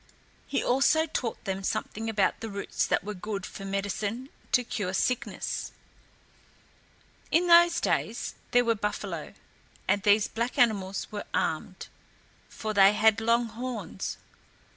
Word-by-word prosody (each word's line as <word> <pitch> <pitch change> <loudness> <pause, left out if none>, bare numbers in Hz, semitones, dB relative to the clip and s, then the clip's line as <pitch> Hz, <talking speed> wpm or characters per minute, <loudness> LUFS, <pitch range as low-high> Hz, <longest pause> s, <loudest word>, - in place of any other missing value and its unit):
He - - -1
also 275 +5 +3
taught 245 -7 -3
them 195 -1 -3
something 220 +3 -2
about 205 -3 +1
the 225 - -5
roots 200 -1 -2
that - - +1
were 210 +2 -4
good 200 0 -5
for 195 - -8
medicine 205 +5 -3 0.2
to 250 - +4
cure 200 -5 -3
sickness. 250 +5 -1 1.6
In 340 +2 +3
those 345 0 +6
days - - -1 0.2
there 245 0 +4
were 230 - +3
buffalo, 210 -1 -4 0.5
and 200 - +2
these 205 +1 +4
black 235 +2 -3
animals 200 -5 +2
were 205 -1 -5
armed, - - -2 0.6
for 215 -1 -4
they 200 0 +7
had 220 +1 +4
long 235 +1 +3
horns. 225 - -5
220 Hz, 135 wpm, -28 LUFS, 200-240 Hz, 1.6 s, they